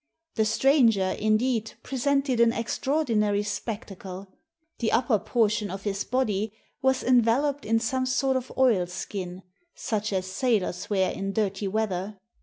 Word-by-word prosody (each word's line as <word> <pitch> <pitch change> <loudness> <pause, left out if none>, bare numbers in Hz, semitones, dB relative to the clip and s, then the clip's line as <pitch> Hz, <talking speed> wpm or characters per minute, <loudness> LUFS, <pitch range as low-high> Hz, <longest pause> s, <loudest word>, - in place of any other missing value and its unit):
The 220 - +1
stranger, 225 -6 +3
indeed, 220 +1 +1
presented 270 -1 0
an 235 -1 +5
extraordinary 230 -4 0
spectacle. 200 -3 -6 0.5
The 230 - 0
upper 235 -4 +2
portion 215 -1 +1
of 195 +1 -6
his 200 -1 -2
body 215 -5 -1 0.3
was 265 0 +2
enveloped 255 +4 +2
in 225 +1 +3
some 255 +2 -1
sort 265 +1 +1
of 260 0 -3
oilskin 185 -5 0 0.2
— - - -44
such 215 -1 -2
as 190 -1 -1
sailors 190 -3 -1
wear 190 -3 +2
in 195 0 -4
dirty 200 -1 -1
weather. 200 -1 -2
220 Hz, 135 wpm, -26 LUFS, 200-255 Hz, 0.5 s, an